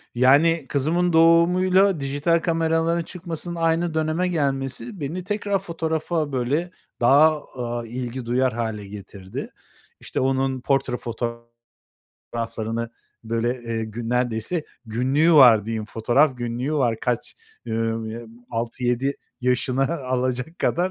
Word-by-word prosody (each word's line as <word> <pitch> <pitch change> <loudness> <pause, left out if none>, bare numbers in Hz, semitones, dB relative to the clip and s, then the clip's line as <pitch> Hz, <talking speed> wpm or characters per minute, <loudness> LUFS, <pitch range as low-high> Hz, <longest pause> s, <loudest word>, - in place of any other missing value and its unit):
Yani 145 +5 +4
kızımın 165 +5 +1
doğumuyla 180 +3 +4
dijital 145 +5 +1
kameraların 165 0 +1
çıkmasının 170 0 -5
aynı 165 0 +1
döneme 160 +3 0
gelmesi 140 - -2
beni 160 +5 -4
tekrar 205 0 -1
fotoğrafa, 160 -3 -2
böyle, 140 +7 -1 0.3
daha, 150 +5 +5
aaa, 120 -2 -4
ilgi 120 +1 -5
duyar 125 +1 +1
hâle 110 -3 -3
getirdi. 100 -1 -8 0.5
İşte, - - -4
onun 130 0 0
portre 135 -2 0 1.1
fotoğraflarını, 115 0 -4 0.3
böyle, 115 +2 -1
eee, 115 -1 -3
gün 115 +2 -6
neredeyse 125 +6 -1 0.2
günlüğü 130 +9 +2
var 120 -8 +8
diyeyim, 110 -1 -3
fotoğraf 125 +6 +2
günlüğü 120 +5 -2
var 120 -6 +1
kaç, 125 -2 -2 0.3
ımm, 115 0 -1
ııı, 115 +1 -7 0.2
6-7 120 +3 -1 0.2
yaşını 130 +5 0
alacak 130 +4 -2
kadar. 180 +2 +1
135 Hz, 115 wpm, -23 LUFS, 120-165 Hz, 1.1 s, var